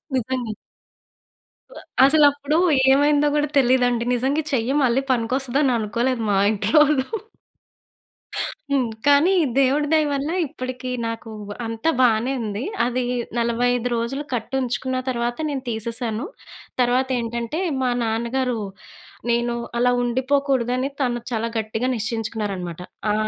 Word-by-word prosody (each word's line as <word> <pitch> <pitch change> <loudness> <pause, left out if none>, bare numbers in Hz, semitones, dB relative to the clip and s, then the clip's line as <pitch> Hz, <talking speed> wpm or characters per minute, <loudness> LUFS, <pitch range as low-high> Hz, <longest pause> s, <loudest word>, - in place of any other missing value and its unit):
నిజమె. 255 -2 -2 1.2
So - - -14 0.3
అసలప్పుడు 285 +1 +4 0.3
ఏమైందో 290 +2 +4
కూడా 295 0 +2
తెలియదండి. 245 -2 +3
నిజంగా 270 +5 0
ఈ - - -12
చెయ్యి 250 +1 +1
మళ్ళీ 255 +1 +3
పనికొస్తదని 260 +3 +1
అనుకోలేదు 230 +3 -1
మా 195 - +3 0.2
ఇంట్లోళ్ళు. 265 +7 +3 1.6
హ్మ్. 265 -4 +1 0.2
కానీ 285 +5 +5 0.3
దేవుడి 275 +2 +3
దయ 310 -1 +4
వల్ల 280 +1 -1 0.2
ఇప్పటికి 255 -1 -6 0.2
నాకు 230 0 -6 0.4
అంత 225 0 -6 0.2
బానే 240 +1 +3
ఉంది. 210 +1 -3 0.2
అది 250 +1 -1 0.4
45 245 +1 +1
రోజులు 235 +5 -2
కట్టుంచుకున్న 255 +2 -2
తరువాత 240 -1 -1
నేను 275 -3 -3
తీసేశాను. 230 +2 -3 0.6
తర్వాతేంటంటే 245 +1 0 0.2
మా 255 - +1
నాన్నగారు 235 +2 -1 0.7
నేను 240 0 +1 0.2
అలా 245 +1 +3
ఉండిపోకూడదని 260 0 0
తను 245 -2 0
చాలా 230 -1 -1
గట్టిగా 220 +3 -2
నిశ్చయించుకున్నారనమాట. 210 -6 -3 0.3
ఆ! - - +2
245 Hz, 110 wpm, -22 LUFS, 230-270 Hz, 1.6 s, కానీ